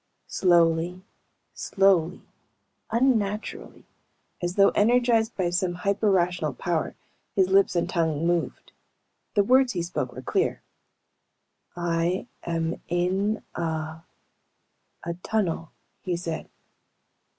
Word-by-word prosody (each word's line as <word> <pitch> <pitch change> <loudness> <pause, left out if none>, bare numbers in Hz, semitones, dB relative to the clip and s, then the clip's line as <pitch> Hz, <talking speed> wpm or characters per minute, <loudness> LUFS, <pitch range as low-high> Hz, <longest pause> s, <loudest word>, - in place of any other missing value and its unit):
Slowly, 175 0 +2 0.5
slowly, 190 -3 +2 0.7
unnaturally 220 -3 -1 0.6
as 175 +1 -2
though 200 -1 +6
energized 230 0 +3
by 180 -3 0
some 175 0 0
hyper 200 +3 +1
rational 175 -6 +1
power 165 +4 -2 0.4
his 190 -1 +3
lips 195 -1 +4
and 170 0 +1
tongue 165 -3 0
moved. 175 -1 -1 0.6
The 205 - +5
words 255 +2 +4
he 175 -3 -1
spoke 175 +2 -3
were - - -8
clear. - - 0 1.1
"I 175 +2 0 0.2
am 165 0 -2
in 190 +5 0
a... 160 -1 -3 1.0
a... 170 - -3
tunnel," 175 -7 -1 0.3
he 180 -3 -2
said. 165 -2 -5
180 Hz, 105 wpm, -26 LUFS, 170-200 Hz, 1.1 s, though